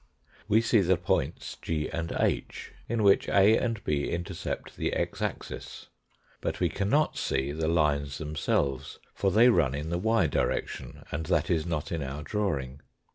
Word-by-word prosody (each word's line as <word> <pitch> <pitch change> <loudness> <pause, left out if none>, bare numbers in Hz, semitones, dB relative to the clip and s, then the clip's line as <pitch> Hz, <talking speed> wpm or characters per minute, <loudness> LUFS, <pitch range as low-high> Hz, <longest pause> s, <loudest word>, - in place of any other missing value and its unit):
We 110 +2 +4
see 115 -2 +3
the 95 -1 +3
points - - -1
G 75 -2 -1
and 85 0 -4
H, - - -1 0.2
in 115 -1 0
which 100 -1 +5
A 100 +2 +6
and 115 -4 -1
B 70 -2 0
intercept 85 0 -4
the - - -1
x - - -2
axis, - - -5 0.5
but - - -2
we - - +2
cannot 105 +11 +1
see 65 +2 -1
the 80 +1 -2
lines 75 -4 +1
themselves, 70 -3 -1 0.2
for 100 - +1
they 110 +6 +6
run 75 - +3
in 75 +3 -4
the 85 - 0
y 110 -1 +3
direction, 70 - -2
and 80 +1 -3
that - - +1
is 80 -1 +1
not 80 -4 -3
in 85 -2 -2
our 70 +2 -5
drawing. 70 -7 -2
80 Hz, 170 wpm, -28 LUFS, 75-100 Hz, 0.5 s, A